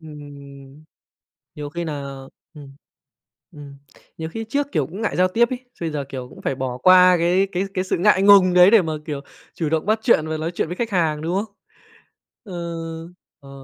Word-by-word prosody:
Ừm, 160 -1 -12
ừm, 145 0 -11
ừm. 140 0 -14 0.8
Nhiều 145 -1 -6
khi 170 +2 -5
nà, 150 -3 -4 0.5
ừm, 140 -2 -13 0.8
ừm, 140 -2 -12 0.4
nhiều 160 0 -5
khi 225 +5 -6
trước 285 +1 -1
kiểu 150 -6 0
cũng 190 +6 -8
ngại 220 - -2
giao 185 0 +4
tiếp 235 +5 +2
ấy, 255 0 -6 0.2
bây 165 -2 -2
giờ, 145 -2 -3
kiểu, 125 -2 -7
cũng - - -14
phải 135 - -2
bỏ 125 -1 -4
qua 180 +3 +6
cái 180 +3 +2
cái 185 +2 -1
cái 185 - -1
sự 185 - -2
ngại 190 +2 +3
ngùng 195 -3 +6
đấy 180 +2 +7
để 225 -4 +6
mà, 160 -2 -3
kiểu, 145 -3 -5 0.3
chủ 160 -3 -3
động 160 +1 -1
bắt 215 +1 +1
chuyện 160 -10 +3
và 160 0 -3
nói 160 +2 -3
chuyện 165 - -2
với 175 - -5
khách 235 -1 -2
hàng, 160 -5 0
đúng 170 +4 -2
không? 215 -2 -15 0.9
Ơ, 185 -6 -7 0.8
ờ. 140 -2 -16
165 Hz, 210 wpm, -21 LUFS, 145-190 Hz, 0.9 s, đấy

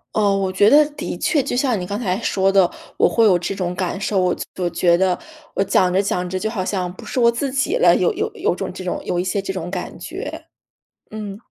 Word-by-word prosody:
哦， 205 -2 +3
我 195 -1 0
觉 205 +3 +4
得 300 +3 +7
的 290 - -5
确 300 - +2
就 260 -1 -3
像 250 -4 +1
你 180 - -5
刚 200 - -3
才 190 -6 -1
说 195 -2 +1
的， 195 -3 +4 0.3
我 - - +5
会 230 - +2
有 190 -5 +5
这 175 +3 -3
种 180 -2 -2
感 185 +1 -2
受， 200 -1 0
我 180 -1 +2
就 - - -5 0.2
我 175 - +1
觉 170 0 +3
得 185 -1 +2 0.4
我 - - +2
讲 185 -1 +2
着 190 +2 +3
讲 180 -2 -1
着 185 - -2
就 220 - -2
好 195 -5 -3
像 180 -3 -2
不 - - -12
是 - - -6
我 235 -1 +5
自 270 +4 -2
己 280 - 0
了， - - +5
有 - - +2
有 - - -2
有 - - 0
种 - - -4
这 - - -7
种 180 - -3
有 175 - -1
一 - - 0
些 190 +2 -1
这 195 0 -4
种 180 -1 -5
感 180 - -5
觉。 - - -7 0.6
嗯。 210 -2 -6
195 Hz, 275 characters per minute, -20 LUFS, 180-215 Hz, 0.6 s, 得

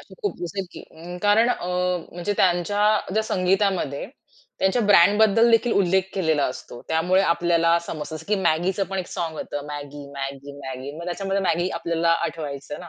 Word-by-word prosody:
असे - - -15
खूप 410 - -2
जसं 190 +2 -4
की - - -9
अ, 175 +2 -9
कारण 210 +3 +4
अ, 175 - -2 0.5
म्हणजे 175 +4 -2
त्यांच्या 180 +3 +2 0.3
ज्या 220 +2 +2
संगीतामध्ये 190 -7 0 0.5
त्यांच्या 190 +5 +2
ब्रँडबद्दल 210 +4 +5
देखील 230 +1 +3
उल्लेख 190 -1 +3
केलेला 160 -6 +1
असतो. 120 -1 -8
त्यामुळे 180 +4 +2
आपल्याला 170 -1 +2
समजतं, 155 0 -5
जसं 160 - -12
की 210 - +3
Maggiच 175 +3 +1
पण 195 - -2
एक 180 - -3
साँग 165 -2 -4
होतं, 145 0 -5
Maggi-Maggi-Maggi 140 -2 -7
मग 170 - -7
त्याच्यामध्ये 195 +2 -2
मॅगी 175 -1 +1
आपल्याला 170 0 0 0.2
आठवायचं 150 -3 -6
ना, 175 - -10
175 Hz, 160 wpm, -23 LUFS, 155-195 Hz, 0.5 s, ब्रँडबद्दल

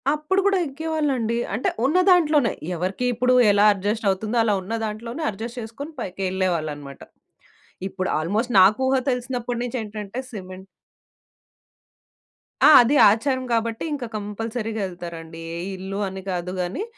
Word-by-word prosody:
అప్పుడు 305 +6 0
కూడా 400 -1 +3
యెక్కేవాళ్ళండి, 285 -6 -1 0.2
అంటే 220 +6 0 0.2
ఉన్నదాంట్లోనే. 315 - +4 0.2
ఎవరికి 185 +7 -2
ఇప్పుడు 250 +2 +2 0.2
ఎలా 205 +1 +4
అడ్జస్టవుతుందో, 205 +2 -1
అలా 215 -2 +2
ఉన్న 190 +5 -6
దాంట్లోనే 230 +7 -5
అడ్జస్ట్ 230 +4 -6
చేసుకొని 230 +8 -8
పైకెళ్ళేవాళ్ళన్నమాట. 175 - -3 0.9
ఇప్పుడు 185 -1 -3
ఆల్మోస్ట్ 215 +10 -1
నాకూహ 215 +8 +4
తెలిసినప్పటి 245 -1 -2
నుంచేంటంటే 220 -2 -5
సిమెంట్ 185 -3 -9 2.0
ఆ! - - +9
అది 245 +5 +2 0.2
ఆచారం 260 +4 0
గాబట్టి, 230 -1 -1
ఇంకా 265 -5 -4
కంపల్సరీగా 220 +1 -4
యెళ్తారండి. 170 -2 -8
ఏ - - -5 0.2
ఇళ్ళు 190 +2 -5
అని 190 0 -6
కాదు 180 -1 -3
గానీ, 180 - -2
220 Hz, 115 wpm, -23 LUFS, 190-250 Hz, 2.0 s, ఆ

